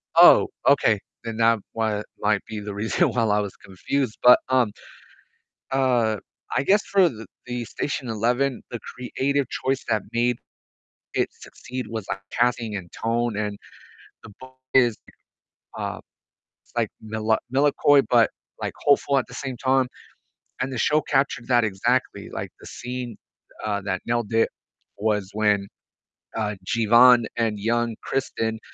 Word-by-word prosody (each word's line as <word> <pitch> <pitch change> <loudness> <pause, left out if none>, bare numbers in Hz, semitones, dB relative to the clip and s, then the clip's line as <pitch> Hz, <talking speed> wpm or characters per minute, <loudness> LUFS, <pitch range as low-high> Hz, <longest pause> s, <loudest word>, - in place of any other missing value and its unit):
Oh, - - +8 0.2
okay, 120 -6 +4 0.2
then 115 -1 -5
that 115 0 +4
wa 110 -2 0 0.2
might 105 -1 +2
be 110 - -5
the 105 0 -6
reason 105 +3 +1
why 120 - 0
I 105 -1 +2
was 100 -2 -4
confused, 110 +6 -2
but, 125 0 +9
um, 125 -5 +3 1.0
uh, 125 -5 +2 0.4
I - - +2
guess 205 +7 +4
for 190 -3 +4
th 115 -4 -9 0.2
the 125 -1 -4
Station 130 +4 -3
Eleven, 120 +4 0
the 120 - -4 0.2
creative 135 +3 -1
choice 135 0 -1
that 110 -2 +2
made 120 0 +1 0.8
it - - +1
succeed 125 0 -8
was, 110 -3 -4
like, 95 0 -3
casting, 120 -3 0
and 90 -3 -6
tone, 115 -1 -1
and 105 -1 -2 0.7
the 110 - -12
book 130 0 -12 0.2
is, 120 -4 +5 0.8
uh, - - -4 0.6
it's, - - -29
like, - - +1
mela 110 0 0 0.2
melancholy, 145 0 +4
but, 115 -3 +5 0.3
like, - - -3
hopeful 140 -1 +4
at 130 - -2
the - - -11
same 135 -2 -5
time, 130 +1 +2 0.8
and 130 +1 -1
the 130 - -3
show 150 +6 +3
captured 135 -5 0
that 120 -2 +4
exactly. 95 -3 -1
Like, - - -5
the - - -14
scene, 125 -1 -6 0.5
uh, 100 -1 -1
that 95 -2 -2
nailed 120 -2 -1
it 115 0 +3 0.5
was 105 -2 0
when, 105 -2 +2 0.7
uh, 105 -2 -1
Jeevan, 120 +2 +6
and 110 -3 0
young 115 +2 0
Kristen 115 -4 -2
115 Hz, 150 wpm, -24 LUFS, 110-130 Hz, 1.0 s, but